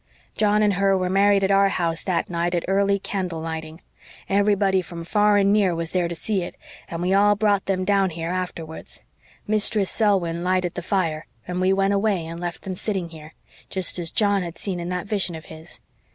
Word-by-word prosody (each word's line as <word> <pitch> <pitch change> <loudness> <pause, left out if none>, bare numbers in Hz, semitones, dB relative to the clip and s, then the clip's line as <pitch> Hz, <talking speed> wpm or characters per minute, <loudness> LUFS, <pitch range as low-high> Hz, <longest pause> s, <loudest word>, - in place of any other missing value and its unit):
John 210 0 +3
and 205 -1 +3
her 195 0 +2
were 185 -1 -1
married 200 0 +4
at 190 - +2
our 195 0 +5
house 170 -3 -1
that 185 -3 0
night 175 0 -1
at 170 - -1
early 200 +1 +2
candle 185 -4 -3
lighting; 160 0 -6 0.5
everybody 200 -1 +2
from 170 -1 -8
far 210 +3 +3
and 200 0 +4
near 195 -5 +3
was 165 0 -4
there 180 -2 +1
to 170 - -5
see 200 +3 -2
it 175 - -6 0.3
and 170 +1 -4
we 185 +2 +1
all 205 +1 +5
brought 205 -2 +1
them 185 -1 0
down 195 -1 +3
here 165 0 -4
afterwards. 175 -3 -6 0.4
Mistress 210 -1 +2
Selwyn 180 -6 +1
lighted 185 -1 0
the - - -4
fire, 165 -4 -1 0.2
and 180 0 -2
we 185 +1 +3
went 195 +1 +2
away 200 -4 +1
and 165 +1 -7
left 175 -1 -5
them 190 - -4
sitting 190 -2 -3
here, 160 -1 -12 0.3
jest 185 -1 -1
as 170 -2 -1
John 205 0 +2
had 170 -2 -6
seen 190 -3 -3
in 170 0 -4
that 180 +1 -3
vision 195 -4 -1
of 160 - -9
his. 160 +1 -11
185 Hz, 210 wpm, -23 LUFS, 170-200 Hz, 0.5 s, our